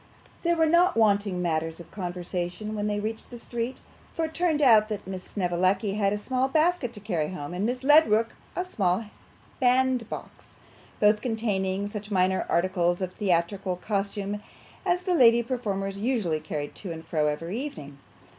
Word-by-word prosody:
There 340 Hz, 0 st, +2 dB
were 325 Hz, -1 st, +3 dB
not 345 Hz, +2 st, +4 dB
wanting 200 Hz, -4 st, +2 dB
matters 165 Hz, -1 st, -1 dB
of 170 Hz, -, -12 dB
conversation 180 Hz, +2 st, -4 dB
when 210 Hz, -1 st, -2 dB
they 205 Hz, 0 st, -1 dB
reached 220 Hz, +1 st, -5 dB
the 245 Hz, -, -8 dB
street, 235 Hz, +1 st, -4 dB, 0.3 s
for 325 Hz, -, 0 dB
it 315 Hz, -, -7 dB
turned 335 Hz, -3 st, +1 dB
out 225 Hz, -6 st, +6 dB
that 210 Hz, -1 st, -4 dB
Miss 190 Hz, -1 st, -6 dB
Snevellicci 185 Hz, +2 st, 0 dB
had 200 Hz, -1 st, +1 dB
a 210 Hz, -, 0 dB
small 255 Hz, +5 st, 0 dB
basket 310 Hz, -3 st, +1 dB
to 210 Hz, -, -9 dB
carry 175 Hz, -7 st, -1 dB
home, 165 Hz, -3 st, -6 dB
and 190 Hz, +4 st, -1 dB
Miss 250 Hz, +2 st, -3 dB
Ledrook 265 Hz, -7 st, +5 dB, 0.3 s
a 360 Hz, -, -1 dB
small 195 Hz, -, 0 dB, 0.5 s
bandbox, 255 Hz, -2 st, 0 dB, 0.4 s
both 210 Hz, 0 st, +4 dB
containing 205 Hz, -5 st, -1 dB
such 210 Hz, 0 st, -7 dB
minor 190 Hz, -1 st, +1 dB
articles 175 Hz, 0 st, +1 dB
of 185 Hz, -1 st, -3 dB
theatrical 185 Hz, -1 st, 0 dB
costume 200 Hz, +1 st, -3 dB, 0.5 s
as 355 Hz, +1 st, +1 dB
the 360 Hz, -, +1 dB
lady 235 Hz, -6 st, +6 dB
performers 200 Hz, -6 st, -3 dB
usually 210 Hz, -9 st, 0 dB
carried 150 Hz, -1 st, -5 dB
to 190 Hz, -, -7 dB
and 160 Hz, 0 st, -7 dB
fro 155 Hz, -2 st, +1 dB
every 165 Hz, +8 st, -2 dB
evening. 145 Hz, -, -8 dB
205 Hz, 165 wpm, -27 LUFS, 180-240 Hz, 0.5 s, out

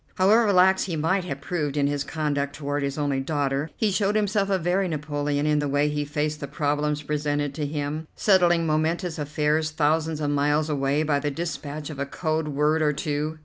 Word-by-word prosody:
However 210 Hz, +3 st, +4 dB
lax 190 Hz, 0 st, +4 dB
he 175 Hz, -4 st, -3 dB
might 180 Hz, +4 st, 0 dB
have 140 Hz, -5 st, -5 dB
proved 150 Hz, -2 st, -2 dB
in 140 Hz, -, +2 dB
his 145 Hz, 0 st, 0 dB
conduct 145 Hz, -2 st, -2 dB
toward 145 Hz, -1 st, -2 dB
his 140 Hz, 0 st, -2 dB
only 145 Hz, -2 st, 0 dB
daughter, 140 Hz, +1 st, -1 dB
he 215 Hz, -2 st, +1 dB
showed 200 Hz, +2 st, +1 dB
himself 205 Hz, -1 st, +1 dB
a 195 Hz, -, +2 dB
very 185 Hz, +2 st, 0 dB
Napoleon 145 Hz, -2 st, -2 dB
in 150 Hz, -1 st, +2 dB
the 145 Hz, -, -1 dB
way 145 Hz, +1 st, +1 dB
he 150 Hz, 0 st, -2 dB
faced 150 Hz, +1 st, -2 dB
the 140 Hz, -, -5 dB
problems 150 Hz, +1 st, -1 dB
presented 145 Hz, -1 st, -1 dB
to 150 Hz, 0 st, -3 dB
him, 150 Hz, +1 st, -3 dB
settling 175 Hz, -4 st, +3 dB
momentous 160 Hz, +2 st, 0 dB
affairs 150 Hz, +1 st, 0 dB
thousands 155 Hz, +1 st, 0 dB
of 145 Hz, -1 st, -1 dB
miles 145 Hz, +2 st, +1 dB
away 140 Hz, +1 st, +1 dB
by 145 Hz, -2 st, +1 dB
the 145 Hz, +1 st, -1 dB
dispatch 150 Hz, -1 st, -5 dB
of 145 Hz, -, -8 dB
a 140 Hz, -, -2 dB
code 155 Hz, +1 st, -2 dB
word 150 Hz, +2 st, +1 dB
or 150 Hz, -1 st, +2 dB
two. 150 Hz, +2 st, -2 dB
150 Hz, 200 wpm, -25 LUFS, 145-160 Hz, -, However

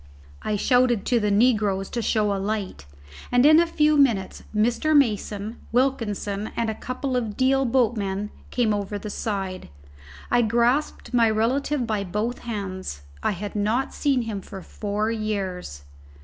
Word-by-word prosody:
I 210 Hz, -, -1 dB
shouted 245 Hz, -1 st, +2 dB
to 240 Hz, -, +2 dB
the 210 Hz, -1 st, 0 dB
negroes 205 Hz, -3 st, +2 dB
to 235 Hz, -, -2 dB
show 215 Hz, -2 st, +1 dB
a 195 Hz, -, -2 dB
light, 200 Hz, -, -3 dB, 0.4 s
and 245 Hz, +2 st, +4 dB
in 310 Hz, +2 st, +8 dB
a 340 Hz, -, +3 dB
few 305 Hz, -2 st, +3 dB
minutes 230 Hz, -10 st, +2 dB
Mr. 240 Hz, +8 st, +3 dB
Mason, 215 Hz, -3 st, 0 dB
Wilkinson, 220 Hz, -5 st, 0 dB
and 230 Hz, -1 st, 0 dB
a -, -, -3 dB
couple 255 Hz, +3 st, -4 dB
of 225 Hz, -4 st, -2 dB
Deal 270 Hz, +1 st, +3 dB
boatmen 210 Hz, -5 st, 0 dB, 0.2 s
came 235 Hz, -4 st, +1 dB
over 205 Hz, 0 st, -3 dB
the 210 Hz, +1 st, -6 dB
side. 195 Hz, -, -4 dB, 0.6 s
I 245 Hz, -, +4 dB
grasped 240 Hz, +6 st, +1 dB
my 230 Hz, -2 st, +4 dB
relative 250 Hz, +5 st, 0 dB
by 215 Hz, -3 st, -1 dB
both 210 Hz, +6 st, -2 dB
hands. 185 Hz, -, -5 dB, 0.2 s
I -, -, +1 dB
had 205 Hz, +3 st, -6 dB
not 215 Hz, +6 st, 0 dB
seen 275 Hz, -4 st, +1 dB
him 215 Hz, -3 st, -4 dB
for 190 Hz, 0 st, -9 dB
four 210 Hz, +1 st, -2 dB
years. 195 Hz, -, -3 dB
220 Hz, 155 wpm, -24 LUFS, 200-245 Hz, 0.6 s, in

